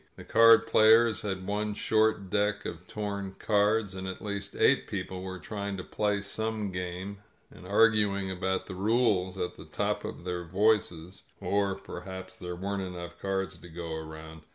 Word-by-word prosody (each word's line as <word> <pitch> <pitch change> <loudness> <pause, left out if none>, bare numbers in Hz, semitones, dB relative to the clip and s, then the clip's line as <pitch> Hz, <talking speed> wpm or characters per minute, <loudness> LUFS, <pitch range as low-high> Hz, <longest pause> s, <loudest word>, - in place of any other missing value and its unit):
The - - -10
card 115 0 +7
players 110 +1 +5
had 95 -3 -3
one 105 +1 -1
short 110 -3 +2
deck 105 0 +1
of 85 +2 -6
torn 100 -2 -4
cards, 105 -1 +2
and 95 0 -5
at 95 - -5
least 100 0 -4
eight - - +3
people 95 -1 -4
were 95 0 -5
try 100 +1 -5
ing 100 - -3
to 95 - -5
play 105 0 0
some 110 0 -2
game 90 +2 -5 0.3
and 90 - -12
arguing 100 -2 +3
about 95 0 -1
the 95 - -7
rules 100 -2 +1
at 90 - -3
the - - -10
top - - -2
of - - -6
their 90 -1 -3
voices, 95 -2 +1 0.2
or 100 -1 +1
perhaps 95 +1 -8
there 90 0 -6
weren't 100 +2 -3
enough 90 -2 -7
cards 95 -2 -2
to 90 - -12
go 85 0 -6
around. 80 0 -8
95 Hz, 175 wpm, -29 LUFS, 90-105 Hz, 0.3 s, card